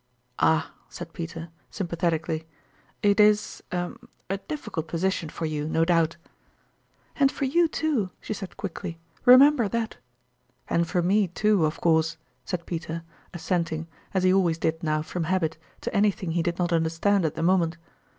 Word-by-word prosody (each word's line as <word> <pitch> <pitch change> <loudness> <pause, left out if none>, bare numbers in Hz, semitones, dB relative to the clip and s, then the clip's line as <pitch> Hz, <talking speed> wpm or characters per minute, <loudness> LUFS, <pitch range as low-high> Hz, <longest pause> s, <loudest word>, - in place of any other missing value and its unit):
" 125 - -43
Ah! 160 0 +2
" - - -33
said 170 -1 -8
Peter, 165 0 -6 0.2
sympathetically, 165 -3 -2 0.3
" - - -35
it 205 +1 +4
is 210 0 +3
er 175 -1 -2 0.4
a 195 - 0
difficult 195 - -5
position 170 0 -1
for 165 - -4
you, 150 -1 -2
no 165 +1 +2
doubt." 165 -1 +2 0.5
" - - -39
And 275 -1 +5
for 275 - -2
you, 335 +6 +3
too! 300 -11 0
" - - -42
she - - -4
said 195 -3 -8
quickly; 170 -3 -5
" - - -34
re 250 0 +10
member 280 -4 +6
that." 230 +1 -2 0.4
" 125 0 -43
And 170 0 +2
for 175 +1 0
me, 200 +3 +3
too, 200 0 +2
of 155 - -5
course," 160 -1 +2 0.3
said 175 -2 -3
Peter, 165 -1 -4 0.3
as 175 - -8
senting, 165 -3 -1 0.3
as 190 -1 0
he 185 0 +5
always 175 -4 +3
did 160 0 -1
now 155 -1 0
from 170 +1 -3
habit, 160 -3 0 0.2
to - - -4
anything 200 -4 +1
he 170 +1 +1
did 170 +1 -1
not 175 -1 0
understand 165 +4 +2
at 160 - -1
the 165 - -2
mo 185 +2 +5
ment. 165 0 -2
170 Hz, 190 wpm, -26 LUFS, 160-200 Hz, 0.5 s, re